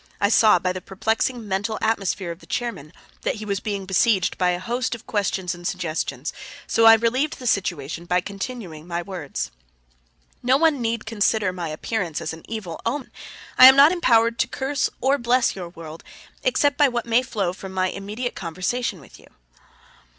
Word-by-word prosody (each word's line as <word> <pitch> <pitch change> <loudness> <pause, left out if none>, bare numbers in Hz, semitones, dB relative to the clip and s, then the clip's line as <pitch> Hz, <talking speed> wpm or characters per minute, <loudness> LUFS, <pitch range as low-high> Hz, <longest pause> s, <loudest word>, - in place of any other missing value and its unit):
I 200 - +2
saw 215 -2 +6
by 180 +1 -1
the 185 - -6
perplexing 220 +5 -1
mental 205 +3 -1
atmosphere 195 -4 -1
of 170 - -9
the - - -17
chairman 235 - -4 0.3
that - - -1
he 215 -1 -7
was 200 -2 -1
being 200 -2 -4
besieged 190 +1 +2
by 180 -1 +1
a 175 - 0
host 240 +5 -2
of 235 - -14
questions 195 -5 -1
and 175 0 -6
suggestions; 160 -7 -3 0.3
so 225 0 +4
I 225 - +10
relieved 255 +8 0
the 255 - -10
situation 170 - -1
by 180 +1 +2
continuing 190 -4 -7
my 170 0 -3
words: 150 - -5 0.9
"No 255 +2 +3
one 305 -3 +2
need 230 -1 -2
consider 215 -3 +1
my 175 -2 -4
appearance 170 +1 -3
as 160 - -4
an 160 - -10
evil 210 -7 -6
omen. 260 +4 -3 0.5
I 255 - +12
am 265 - +9
not 280 +3 +8
empowered 235 -10 +3
to - - +2
curse 270 +2 -1
or 275 +2 +2
bless 245 +1 +2
your 180 -3 -6
world 165 -2 -10 0.4
except 290 - +1
by 290 - +6
what 240 -2 -2
may 235 +1 +3
flow 205 -8 -2
from 190 0 -9
my 185 0 0
immediate 210 +6 -5
conversation 185 +5 -3
with - - -16
you." - - -18
205 Hz, 185 wpm, -23 LUFS, 180-240 Hz, 0.9 s, I